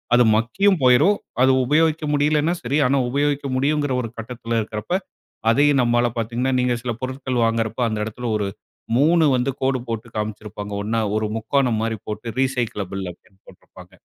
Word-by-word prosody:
அது 125 Hz, -, +6 dB
மக்கியும் 185 Hz, -, +2 dB
போய்ரும் 125 Hz, +12 st, +5 dB, 0.3 s
அது 130 Hz, -, +5 dB
உபயோகிக்க 155 Hz, +3 st, +2 dB
முடியலைன்னா 150 Hz, +3 st, +2 dB
சரி. 130 Hz, +5 st, 0 dB
ஆனா, 140 Hz, +2 st, +2 dB
உபயோகிக்க 145 Hz, +1 st, 0 dB
முடியுங்கிற 145 Hz, 0 st, +1 dB
ஒரு 115 Hz, -, -5 dB
கட்டத்ல 115 Hz, 0 st, -3 dB
இருக்றப்போ 110 Hz, -, -2 dB, 0.5 s
அதையும் 140 Hz, +2 st, +4 dB
நம்மால 120 Hz, 0 st, +2 dB
பாத்தீங்கன்னா, 120 Hz, +3 st, -1 dB
நீங்க 125 Hz, -1 st, +1 dB
சில 125 Hz, -, -2 dB
பொருட்கள் 130 Hz, -2 st, -2 dB
வாங்குறப்போ 115 Hz, +1 st, 0 dB
அந்த 110 Hz, -1 st, -2 dB
இடத்துல 120 Hz, +3 st, -6 dB
ஒரு 105 Hz, -1 st, -2 dB, 0.5 s
3 160 Hz, +4 st, +4 dB
வந்து 125 Hz, +2 st, 0 dB
கோடு 135 Hz, 0 st, +1 dB
போட்டு 115 Hz, 0 st, -4 dB
காமிச்சிருப்பாங்க. 105 Hz, -1 st, -5 dB
ஒண்ணா 110 Hz, +2 st, 0 dB, 0.2 s
ஒரு 110 Hz, 0 st, -1 dB
முக்கோணம் 120 Hz, 0 st, +1 dB
மாரி 115 Hz, 0 st, -2 dB
போட்டு 110 Hz, +2 st, -5 dB
ரீசைக்கிளபிள் 120 Hz, -7 st, -2 dB
அப்டின்னு 95 Hz, +2 st, -23 dB
போட்டிருப்பாங்க. -, -, -16 dB
125 Hz, 155 wpm, -22 LUFS, 110-140 Hz, 0.5 s, அது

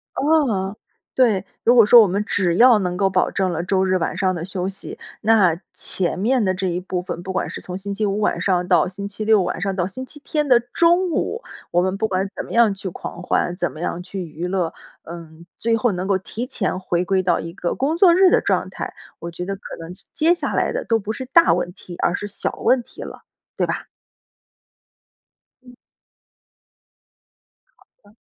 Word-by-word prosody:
哦， 255 Hz, -11 st, +1 dB, 0.4 s
对， 215 Hz, -7 st, +3 dB, 0.2 s
如 240 Hz, -, +5 dB
果 230 Hz, -3 st, +8 dB
说 235 Hz, +2 st, +9 dB
我 210 Hz, -, +4 dB
们 200 Hz, +3 st, -1 dB
只 180 Hz, -5 st, 0 dB
要 240 Hz, +2 st, +6 dB
能 180 Hz, -2 st, -2 dB
够 195 Hz, -1 st, +2 dB
保 185 Hz, -1 st, +1 dB
证 190 Hz, -2 st, 0 dB
了 165 Hz, 0 st, -2 dB
周 190 Hz, +1 st, +1 dB
日 185 Hz, 0 st, +2 dB
晚 170 Hz, +1 st, -2 dB
上 185 Hz, -1 st, +1 dB
的 165 Hz, 0 st, -4 dB
休 185 Hz, -1 st, -3 dB
息， 195 Hz, 0 st, -8 dB, 0.2 s
那 200 Hz, -7 st, +3 dB
前 180 Hz, -1 st, -2 dB
面 240 Hz, +4 st, +2 dB
的 185 Hz, -2 st, +1 dB
这 190 Hz, +1 st, -2 dB
一 175 Hz, 0 st, -1 dB
部 180 Hz, 0 st, -3 dB
分 175 Hz, -1 st, -6 dB
不 190 Hz, -, -5 dB
管 185 Hz, -, -1 dB
是 -, -, -7 dB
从 180 Hz, 0 st, -6 dB
星 200 Hz, +1 st, -5 dB
期 210 Hz, +2 st, -1 dB
五 200 Hz, 0 st, -1 dB
晚 210 Hz, -, 0 dB
上 180 Hz, -2 st, +1 dB
到 180 Hz, -2 st, +4 dB
星 200 Hz, +2 st, -6 dB
期 205 Hz, +1 st, -6 dB
六 215 Hz, -2 st, +5 dB
晚 180 Hz, -, -3 dB
上 195 Hz, 0 st, -1 dB
到 180 Hz, -1 st, 0 dB
星 255 Hz, +7 st, -7 dB
期 295 Hz, -, -12 dB
天 300 Hz, -2 st, -1 dB
的 245 Hz, -2 st, +6 dB
中 340 Hz, +9 st, +2 dB
午， 465 Hz, +9 st, -2 dB, 0.3 s
我 175 Hz, -, +3 dB
们 185 Hz, +2 st, -1 dB
不 220 Hz, +1 st, 0 dB
管 190 Hz, 0 st, -1 dB
怎 -, -, -5 dB
么 -, -, -12 dB
样 230 Hz, -3 st, +4 dB
去 195 Hz, -1 st, -6 dB
狂 175 Hz, 0 st, -8 dB
欢， 175 Hz, -1 st, 0 dB
怎 175 Hz, -5 st, -2 dB
么 155 Hz, -, -11 dB
样 175 Hz, 0 st, -3 dB
去 185 Hz, +1 st, -6 dB
娱 165 Hz, +2 st, -6 dB
乐， 180 Hz, -3 st, -1 dB, 0.3 s
嗯， 165 Hz, 0 st, -11 dB
最 230 Hz, 0 st, +1 dB
后 225 Hz, +1 st, +1 dB
能 185 Hz, 0 st, -3 dB
够 195 Hz, -, +2 dB
提 220 Hz, +6 st, -5 dB
前 190 Hz, -8 st, -2 dB
回 180 Hz, -2 st, -1 dB
归 190 Hz, 0 st, +1 dB
到 175 Hz, -1 st, +2 dB
一 165 Hz, 0 st, -7 dB
个 175 Hz, -1 st, -3 dB
工 300 Hz, +5 st, 0 dB
作 350 Hz, -2 st, +6 dB
日 375 Hz, +1 st, +6 dB
的 -, -, +3 dB
状 -, -, 0 dB
态， -, -, -6 dB, 0.3 s
我 170 Hz, -, -6 dB
觉 180 Hz, +1 st, -6 dB
得 195 Hz, -, -3 dB
可 195 Hz, -, -18 dB, 0.2 s
能 165 Hz, +1 st, -8 dB
接 185 Hz, -, -11 dB
接 335 Hz, +2 st, +3 dB
下 -, -, -3 dB
来 -, -, +1 dB
的 -, -, -3 dB
都 225 Hz, -1 st, +2 dB
不 210 Hz, +2 st, -4 dB
是 260 Hz, -, -6 dB
大 335 Hz, +6 st, +5 dB
问 175 Hz, -, -2 dB
题， 180 Hz, -3 st, -11 dB
而 175 Hz, -, +1 dB
是 205 Hz, -, -4 dB
小 200 Hz, -, -2 dB
问 255 Hz, -1 st, +3 dB
题 -, -, -13 dB
了， -, -, -9 dB, 0.3 s
对 -, -, +1 dB
吧？ -, -, -3 dB, 1.8 s
嗯。 250 Hz, -1 st, -15 dB, 2.0 s
好 -, -, -24 dB, 0.2 s
的。 205 Hz, +1 st, -22 dB
195 Hz, 240 characters per minute, -21 LUFS, 180-225 Hz, 2.0 s, 说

